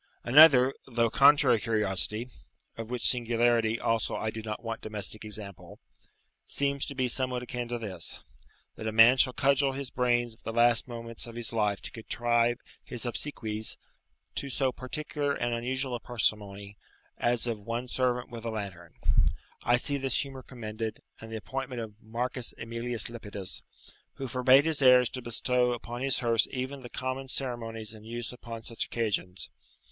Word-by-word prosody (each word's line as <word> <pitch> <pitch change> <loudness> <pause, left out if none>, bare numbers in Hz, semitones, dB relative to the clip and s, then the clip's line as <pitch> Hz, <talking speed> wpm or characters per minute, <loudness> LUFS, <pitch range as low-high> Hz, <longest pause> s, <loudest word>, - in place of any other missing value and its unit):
Another, 135 -1 +8
though 115 -3 +1
contrary 140 -4 +6
curiosity 105 +2 0 0.4
(of 115 -1 -7
which 125 -1 +1
singularity, 120 -2 +2
also, 115 -1 0
I 110 - -2
do 110 - -6
not 110 +1 -5
want 115 -1 -4
domestic 110 0 -4
example), 105 -3 -7 0.7
seems 140 0 0
to 140 - -6
be 130 -1 +1
somewhat 125 0 -1
akin 125 -1 -4
to 120 0 -3
this, 95 -7 -5 0.6
that 110 - -5
a - - 0
man 115 +4 +7
shall 130 0 +5
cudgel 135 +1 +2
his 135 -1 -5
brains 120 -2 +1
at 110 - -21
the - - -4
last 120 +1 +3
moments 115 -1 -7
of 115 - -10
his 120 -1 -1
life 105 -3 0
to - - -7
contrive 120 +1 +1 0.3
his 120 -1 -4
obsequies 110 -4 -2 0.6
to 140 - -3
so 130 0 +1
particular 145 +2 -3
and 120 0 -1
unusual 130 +2 -1
a 120 - -2
parsimony 105 -4 -2 0.4
as 120 -1 +2
of 115 -3 -2
one 115 +4 -4
servant 125 -1 0
with 115 -1 -7
a 115 - -2
lantern, 95 -6 -6 0.7
I 120 - +3
see 140 +3 +4
this 135 -4 +1
humour 135 -1 -9
commended, 110 -3 -6 0.2
and 110 0 -10
the - - -4
appointment 130 +2 -5
of 110 -2 -6
Marcus. 120 +3 -2
Emilius 115 +1 -3
Lepidus, 105 -5 -5 0.5
who 135 - -5
forbade 130 +3 +5
his 160 -3 +1
heirs 125 -2 +7
to 130 - -5
bestow 125 +1 +2
upon 120 +1 -6
his 135 0 +2
hearse 115 -2 +3
even 130 +2 -4
the 120 - -9
common 130 +2 -4
ceremonies 115 -4 -3
in 110 -1 -12
use 120 +2 -5
upon 115 -2 -8
such 115 0 -4
occasions. 100 -5 -2
120 Hz, 165 wpm, -29 LUFS, 110-130 Hz, 0.7 s, Another